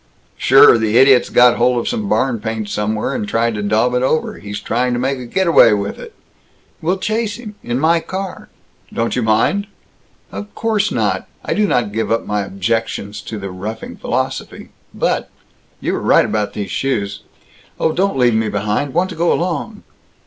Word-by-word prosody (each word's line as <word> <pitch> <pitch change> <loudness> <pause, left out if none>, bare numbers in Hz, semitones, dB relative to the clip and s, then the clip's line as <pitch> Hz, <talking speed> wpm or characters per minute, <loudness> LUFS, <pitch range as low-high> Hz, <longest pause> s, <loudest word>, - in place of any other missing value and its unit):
"Sure. 115 - +6
The 110 +1 +1
idiot's 135 -1 +5
got 125 -1 +5
hold 125 -1 +2
of - - -4
some 220 -4 -2
barn 125 -4 +1
paint 110 -1 -4
somewhere, 105 +1 -1
and 105 - -3
tried 115 0 +1
to 105 - -3
daub 110 +4 +1
it 125 - +1
over. 145 +4 0
He's 105 0 -6
trying 125 +2 -1
to 120 - -1
make 135 +1 -1
a 125 - -7
getaway 170 - +5
with 100 -1 -3
it!" - - -11 0.7
"We'll 180 +4 0
chase 215 +2 -1
him. 220 -3 -9
In 120 +1 -2
my 165 +3 +3
car." 190 +3 -6 0.4
"Don't 115 0 -1
you 125 - 0
mind?" 115 - +1 0.6
"Of 210 0 -8
course 215 -2 0
not. - - -1 0.2
I - - 0
do 210 0 +2
not 120 - 0
give 110 +2 -2
up 115 - 0
my 105 0 -1
objections 100 0 -3
to 110 - -7
the 100 -2 -6
roughing 105 +5 -6
philosophy, - - -4 0.2
but - - -1 0.5
You - - -2
were - - -2
right - - +4
about 105 -2 -2
these 100 -3 -5
shoes 100 -7 -2 0.6
Oh, 160 - +2
don't 190 -1 0
leave 120 -2 +3
me 110 -1 +1
behind! 105 +7 -2
Want 185 +2 +1
to - - -7
go 170 +1 +1
along!" 180 +5 -2
120 Hz, 185 wpm, -18 LUFS, 105-170 Hz, 0.7 s, Sure